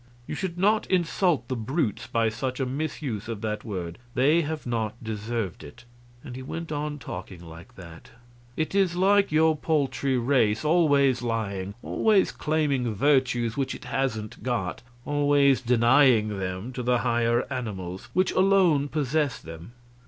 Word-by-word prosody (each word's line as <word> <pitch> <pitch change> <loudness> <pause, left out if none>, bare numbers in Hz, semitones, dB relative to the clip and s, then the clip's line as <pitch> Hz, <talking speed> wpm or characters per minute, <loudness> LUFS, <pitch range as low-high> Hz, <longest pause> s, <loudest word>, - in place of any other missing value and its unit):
You - - -6
should 175 +2 -4
not 210 +4 +2
insult 175 -6 +1
the 130 - -2
brutes 120 - -2
by 115 -1 +1
such 125 +4 -4
a 135 - 0
misuse 130 -5 -4
of 115 -3 -5
that 105 -1 -3
word; 90 -6 -5 0.2
they 150 +7 +4
have 155 0 -4
not 115 -3 -2
deserved 110 -4 -4
it," 75 +10 -13 0.4
and 130 -5 -8
he 130 - -7
went 165 +5 -6
on 150 0 -3
talking 90 -7 -8
like 85 +1 -13
that. 85 -3 -12 0.5
"It 155 +2 -1
is 190 -3 +2
like 200 +1 +3
your 160 +1 +4
paltry 135 -4 0
race 115 -3 +1
always 145 -6 +3
lying, 100 -5 -3
always 210 -3 +2
claiming 140 -7 -1
virtues 120 -2 +2
which 135 -2 -2
it - - -11
hasn't 125 -5 -3
got, 115 -6 -2 0.2
always 145 -2 +3
denying 120 -1 +4
them 95 +6 -4
to 125 - -4
the 125 0 +2
higher 120 0 +1
animals, 95 -7 -5
which 185 0 +2
alone 185 -7 +3
possess 145 -1 0
them. 80 +6 -11
130 Hz, 150 wpm, -26 LUFS, 110-150 Hz, 0.5 s, they